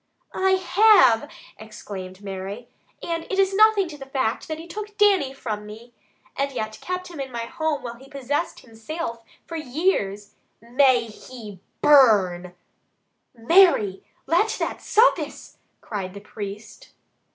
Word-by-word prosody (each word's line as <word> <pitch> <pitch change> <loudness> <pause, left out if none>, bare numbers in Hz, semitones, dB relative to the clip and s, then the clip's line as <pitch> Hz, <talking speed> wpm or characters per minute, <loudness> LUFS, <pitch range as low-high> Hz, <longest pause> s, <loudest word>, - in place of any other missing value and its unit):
"I 380 0 +2
have!" 375 - +5 0.3
exclaimed 200 -3 -9
Mary. 195 +4 -6 0.4
"And 330 -1 -3
it 390 - -4
is 390 0 +3
nothing 425 -2 +4
to 295 -2 -10
the 270 - -9
fact 260 -4 -2
that 315 - -4
he 325 - -9
took 415 +4 -8
Dannie 390 -10 +3
from 215 -6 -6
me, 225 +3 -12 0.4
and 275 0 -1
yet 215 -4 -5
kept 365 0 -4
him 335 -4 -10
in 270 -1 -5
my 235 -1 -4
home 310 +3 -2
while 240 -1 -5
he 265 +3 -16
possessed 285 +4 -3
me 230 - -18
himsilf 230 +1 -6 0.2
for 330 - -6
years. 245 - -1 0.3
May 245 +1 +3
he 215 -3 -11 0.2
burn 190 -11 +4 0.4
" - - -47
"Mary! 230 - +4 0.2
Let 420 +9 +2
that - - -3
suffice!" 455 +4 +1 0.2
cried 195 -3 -6
the - - -7
priest. 210 - -9
260 Hz, 145 wpm, -23 LUFS, 215-340 Hz, 0.4 s, have